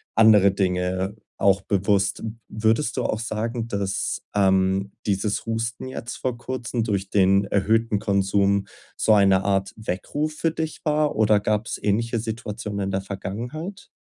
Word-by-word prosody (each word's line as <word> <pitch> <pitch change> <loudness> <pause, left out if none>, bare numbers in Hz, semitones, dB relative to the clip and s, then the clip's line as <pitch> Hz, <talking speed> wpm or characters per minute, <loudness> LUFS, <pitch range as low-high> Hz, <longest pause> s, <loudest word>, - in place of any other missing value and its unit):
andere 105 -3 +6
Dinge 95 0 -1 0.2
auch 100 -1 +3
bewusst. 100 +1 +1 0.3
Würdest 110 +4 +1
du - - 0
auch 110 - -1
sagen, 115 +1 -3
dass, 100 -3 -2
ähm, 95 0 +2 0.2
dieses 100 +1 0
Husten 115 +2 -3
jetzt 120 -2 -6
vor 125 -2 -2
Kurzem 120 -1 -3
durch 100 -3 -2
den 100 0 +4
erhöhten 105 +2 +1
Konsum 100 0 +2 0.3
so 110 - +4
eine 95 -2 +5
Art 95 -1 0
Weckruf 110 +9 -3
für 155 +2 0
dich 160 -1 -4
war 150 0 +1
oder 110 -1 +4
gab's 105 +2 -1
ähnliche 115 +3 0
Situationen 110 -2 -5
in 95 - -2
der 95 - -1
Vergangenheit? 120 - -6
105 Hz, 140 wpm, -24 LUFS, 100-115 Hz, 0.3 s, andere